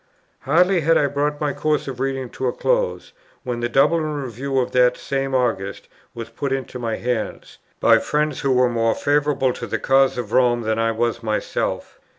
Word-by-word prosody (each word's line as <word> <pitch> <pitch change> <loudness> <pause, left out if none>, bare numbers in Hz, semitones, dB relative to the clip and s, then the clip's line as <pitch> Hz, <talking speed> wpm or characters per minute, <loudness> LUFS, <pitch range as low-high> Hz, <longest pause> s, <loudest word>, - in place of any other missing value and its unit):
Hardly 180 +5 +3
had 165 +2 +3
I - - +3
brought 145 +1 -1
my 145 -2 -1
course 155 -2 -1
of 130 -2 -6
reading 135 -2 -2
to 130 - -3
a - - +1
close, - - -1 0.3
when 125 -2 -3
the 120 0 -1
Dublin 150 +7 +3
Review 140 -3 -3
of 125 - 0
that 125 0 +3
same 135 -1 -2
August 115 -6 -1 0.3
was 115 -1 -6
put 135 +4 -4
into 130 -1 -3
my 115 -2 -2
hands, 120 -2 -4 0.2
by - - +5
friends 150 0 -1
who 140 - 0
were 125 0 +4
more 115 -1 +1
favourable 145 -3 +1
to - - -7
the - - -2
cause 135 -1 +3
of 115 -4 -4
Rome 120 -1 +3
than 110 0 -1
I 115 0 +2
was 115 +1 -1
myself. 110 -2 -3
130 Hz, 190 wpm, -21 LUFS, 120-145 Hz, 0.3 s, by